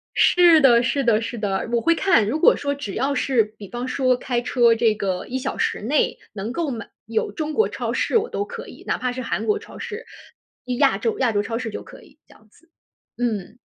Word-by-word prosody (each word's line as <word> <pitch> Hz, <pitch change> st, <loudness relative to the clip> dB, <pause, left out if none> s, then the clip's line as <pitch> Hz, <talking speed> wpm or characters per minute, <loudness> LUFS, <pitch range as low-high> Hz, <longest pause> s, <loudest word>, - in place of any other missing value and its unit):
是 345 Hz, -2 st, +6 dB
的， 240 Hz, -4 st, +6 dB
是 275 Hz, +3 st, 0 dB
的， 230 Hz, -3 st, +3 dB
是 230 Hz, +1 st, -5 dB
的， 205 Hz, -1 st, -2 dB
我 235 Hz, -1 st, +1 dB
会 335 Hz, -, +4 dB
看， 330 Hz, -, +3 dB
如 280 Hz, +9 st, -1 dB
果 -, -, +6 dB
说 285 Hz, 0 st, -2 dB
只 280 Hz, -9 st, -6 dB
要 270 Hz, +4 st, 0 dB
是 260 Hz, -5 st, +2 dB
比 210 Hz, -2 st, -12 dB
方 240 Hz, +5 st, -4 dB
说 255 Hz, 0 st, +2 dB
开 245 Hz, -1 st, -2 dB
车 240 Hz, -1 st, +3 dB
这 225 Hz, -1 st, +2 dB
个 190 Hz, -3 st, -3 dB
1 255 Hz, -, -3 dB
小 265 Hz, +1 st, -4 dB
时 -, -, -1 dB
内， 270 Hz, +8 st, +1 dB, 0.2 s
能 210 Hz, +2 st, -4 dB
够 310 Hz, +1 st, -2 dB
买 230 Hz, -2 st, -6 dB, 0.2 s
有 220 Hz, 0 st, -1 dB
中 310 Hz, -1 st, -4 dB
国 440 Hz, -, +2 dB
超 -, -, -3 dB
市 -, -, +1 dB
我 450 Hz, +2 st, -1 dB
都 405 Hz, -, -2 dB
可 475 Hz, +1 st, -8 dB
以， -, -, -13 dB
哪 -, -, 0 dB
怕 250 Hz, -, -2 dB
是 255 Hz, +1 st, -5 dB
韩 -, -, -2 dB
国 425 Hz, 0 st, +1 dB
超 435 Hz, -, -13 dB
市， 465 Hz, 0 st, -6 dB, 0.7 s
亚 280 Hz, -2 st, +4 dB
洲 445 Hz, -2 st, -2 dB
亚 250 Hz, -3 st, +2 dB
洲 205 Hz, -1 st, +1 dB
超 225 Hz, +2 st, -3 dB
市 230 Hz, -1 st, -4 dB
就 210 Hz, -, -6 dB
可 -, -, -14 dB
以 280 Hz, -, -20 dB
这 -, -, -18 dB
样 215 Hz, -, -23 dB
子， 330 Hz, +10 st, -26 dB, 0.5 s
嗯。 230 Hz, -2 st, -3 dB
250 Hz, 250 characters per minute, -22 LUFS, 225-305 Hz, 0.7 s, 是